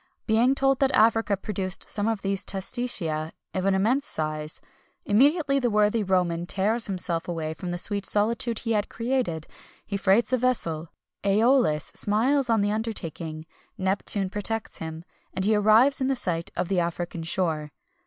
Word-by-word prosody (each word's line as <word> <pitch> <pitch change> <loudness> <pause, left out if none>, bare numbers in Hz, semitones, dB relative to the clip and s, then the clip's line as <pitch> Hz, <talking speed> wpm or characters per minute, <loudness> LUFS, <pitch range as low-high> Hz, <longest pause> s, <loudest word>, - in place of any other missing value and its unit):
Being 240 +4 +3
told 270 -1 +2
that 270 - +3
Africa 225 -3 +3
produced 190 -2 -3
some 205 0 +1
of 225 -3 -2
these 195 -1 +1
testacea 190 -7 0 0.2
of 185 0 -2
an 195 -1 +3
immense 240 +9 +1
size, 155 0 -3 0.5
immediately 275 - +3
the 245 -2 +1
worthy 210 +1 +2
Roman 175 -3 0
tears 215 +5 0
himself 180 -4 -2
away 160 -2 -3
from 180 +2 -7
the 175 - -3
sweet 200 +2 0
solitude 230 +2 +1
he 230 - -3
had 210 -2 0
created; 230 -10 -2 0.4
he 200 - -3
freights 200 +6 +2
a - - +4
vessel, 170 -11 -1 0.3
Æolus 205 - +2
smiles 245 +6 +1
on 225 -2 +3
the 205 0 +1
undertaking, 165 -8 -4 0.3
Neptune 190 0 -1
protects 215 +2 -3
him, 160 +1 -7 0.3
and 190 - -1
he 215 - +3
arrives 220 +7 +4
in 265 +1 +1
sight 170 -8 -1
of 180 0 -1
the 190 -1 +1
African 170 0 -3
shore. 160 -3 0
205 Hz, 160 wpm, -25 LUFS, 175-230 Hz, 0.5 s, a